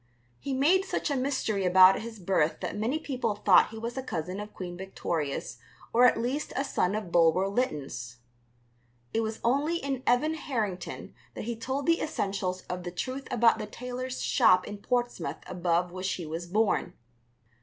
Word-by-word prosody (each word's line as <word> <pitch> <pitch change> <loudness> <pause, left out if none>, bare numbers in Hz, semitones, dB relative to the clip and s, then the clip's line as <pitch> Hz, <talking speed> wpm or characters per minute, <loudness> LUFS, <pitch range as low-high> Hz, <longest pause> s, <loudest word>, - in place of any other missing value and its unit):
He 275 -1 -3
made 330 +8 +4
such 370 -5 -2
a - - +1
mystery 255 -7 0
about 185 +1 +7
his 225 0 -7
birth 180 -4 +1
that - - -3
many 225 +8 0
people 255 -8 -2
thought 205 -3 +5
he 225 - -9
was 235 +2 -4
a - - -1
cousin 180 -5 -4
of 210 0 -7
Queen 175 -2 -7
Victoria's 160 -9 -3 0.3
or 240 +2 +6
at 230 - +2
least 255 +6 -2
a 275 - +1
son 200 -7 0
of 210 -5 -4
Bulwer 170 +3 +4
Lytton's. 145 - -3 1.0
It 225 - +2
was 220 0 -3
only 285 +8 +2
in 275 -5 -3
Evan 255 +6 +3
Harrington 220 - -4 0.2
that - - -5
he 235 +2 -3
told 265 +5 -3
the 335 0 +3
essentials 195 -9 -2
of 180 0 -5
the 175 - -5
truth 255 +10 -4
about 230 -2 +4
the 215 - -4
tailor's 250 +3 -5
shop 185 0 +4
in 205 -1 -7
Portsmouth 240 - -1
above 175 -1 0
which 185 +1 -2
he 175 - -5
was 165 +3 -5
born. 210 +4 +1
215 Hz, 175 wpm, -28 LUFS, 180-255 Hz, 1.0 s, about